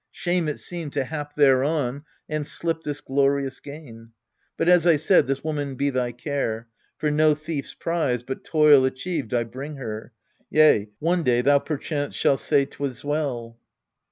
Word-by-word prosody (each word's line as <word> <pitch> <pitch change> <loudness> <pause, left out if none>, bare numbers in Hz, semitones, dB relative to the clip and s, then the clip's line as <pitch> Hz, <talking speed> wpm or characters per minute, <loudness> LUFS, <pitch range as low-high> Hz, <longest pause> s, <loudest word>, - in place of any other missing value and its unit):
Shame 175 -2 -1
it 150 - -3
seemed 170 -5 -6
To 140 - 0
hap 145 +1 -6
thereon, 140 0 +2 0.2
and 155 -1 -3
slip 165 -1 -2
this 145 -2 -4
glorious 135 0 0
gain. 120 -6 -11 0.4
But, - - 0
as 175 -1 +5
I 170 - +6
said, 160 +3 +3
this 135 0 -2
woman 145 -3 -3
be 140 +2 0
thy 125 -2 -1
care: 120 -3 -3 0.3
For 150 - 0
no 155 0 +4
thief's 155 -2 -5
prize, 155 -8 -1
but 130 +2 -6
toil 150 -4 +5
achieved, 130 0 -2
I 120 -1 +1
bring 135 +6 -7
her. 110 -3 -6 0.4
Yea, 150 -9 +4
one 170 +3 +1
day 125 -5 +2
thou 140 +2 +5
perchance 145 -1 -3
shalt 135 - +2
say 140 -2 +2
'twas 135 -3 -6
well. 130 -6 -3
145 Hz, 165 wpm, -24 LUFS, 130-155 Hz, 0.4 s, I